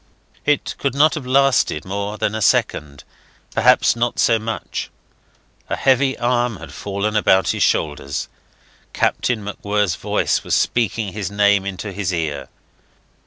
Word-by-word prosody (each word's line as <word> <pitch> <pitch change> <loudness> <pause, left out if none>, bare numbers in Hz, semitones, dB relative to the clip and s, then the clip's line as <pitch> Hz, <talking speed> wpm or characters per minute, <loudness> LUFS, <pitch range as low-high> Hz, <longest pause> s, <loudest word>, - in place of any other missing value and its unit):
It 150 -1 +1
could 140 -1 -1
not 150 +2 +4
have 140 -5 -5
lasted 135 - +2
more 100 +2 -4
than 105 - -1
a 110 - -3
second, 70 -7 0 0.5
perhaps - - +4
not 120 0 -1
so 115 -2 +3
much. 110 +1 -5 0.8
A - - 0
heavy 135 0 +2
arm 120 -2 0
had 80 -3 -11
fallen 100 +2 -3
about 95 -3 +3
his - - -1
shoulders; 75 -2 0 0.7
Captain 115 -4 0
MacWhirr's 105 -1 -1
voice - - 0
was - - 0
speaking 110 -4 0
his 100 -5 -4
name 100 -1 +2
into 100 +2 -5
his 95 -1 -2
ear. 80 -4 -3
105 Hz, 140 wpm, -20 LUFS, 95-120 Hz, 0.8 s, not